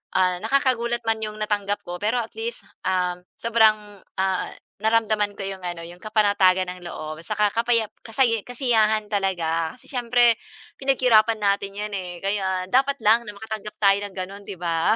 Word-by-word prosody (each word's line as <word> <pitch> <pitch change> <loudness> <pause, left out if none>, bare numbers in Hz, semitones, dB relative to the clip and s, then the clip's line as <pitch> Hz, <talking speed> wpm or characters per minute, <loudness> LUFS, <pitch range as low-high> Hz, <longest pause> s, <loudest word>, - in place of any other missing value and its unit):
ah, 185 -1 +3
nakakagulat 240 -2 +1
man 220 0 +1
yung 215 0 -4
natanggap 205 -1 -1
ko, 175 0 -6
pero 220 +4 +1
at 225 - -8
least, 460 +1 -4 0.2
uhm, 180 -1 0 0.2
sobrang, 215 -3 +2 0.2
ah, 190 -1 0 0.3
naramdaman 215 -1 +1
ko 195 - -6
yung, 195 -1 -5
ano, 175 -1 -4
yung 175 +1 -12
kapanatagan 200 -4 +3
ng 180 0 -10
loob 155 -1 -6
saka 210 +1 +1
kapayap 230 -2 +1
kasaya 230 0 +2
kasiyahan 220 -4 +2
talaga. 165 -5 0
Kasi - - -19
siyempre, 240 -2 +3 0.4
pinaghirapan 245 -5 +4
natin 200 -1 0
‘yan, 210 0 -4
eh, 180 -2 -5
kaya 190 -2 0
dapat 275 +2 +3
lang 225 +3 +5
na 210 - -7
makatanggap 215 0 -7
tayo 195 -1 +5
ng 195 - -16
ganon, 195 +2 -6
‘di 200 - -6
ba? 165 +2 +1
210 Hz, 165 wpm, -24 LUFS, 190-230 Hz, 0.4 s, lang